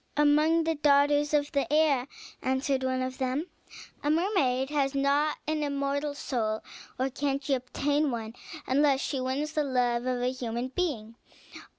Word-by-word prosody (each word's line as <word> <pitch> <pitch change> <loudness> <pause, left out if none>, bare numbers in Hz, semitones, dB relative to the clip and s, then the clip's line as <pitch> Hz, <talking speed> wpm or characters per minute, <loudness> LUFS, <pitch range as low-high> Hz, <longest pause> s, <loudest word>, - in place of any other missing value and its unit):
"Among 305 +3 +4
the 325 0 +1
daughters 290 0 +3
of 290 -1 +1
the 280 -2 -1
air," 295 -4 +3 0.3
answered 265 +1 0
one 260 0 0
of 255 0 -5
them. 260 +4 -1 0.6
"A 290 - +1
mermaid 295 -6 +1
has 280 -2 0
not 285 +2 +2
an 310 0 -1
immortal 285 0 -1
soul, 220 -6 -2 0.3
nor 265 +1 -1
can 275 +1 -1
she 275 0 -1
obtain 285 +3 0
one 225 -3 -4 0.3
unless 275 0 +3
she 270 -1 -2
wins 270 +4 -2
the 305 - +1
love 250 -2 0
of 250 -1 -1
a 250 - +1
human 245 -1 -4
being. 250 -9 -3
275 Hz, 160 wpm, -28 LUFS, 255-295 Hz, 0.6 s, Among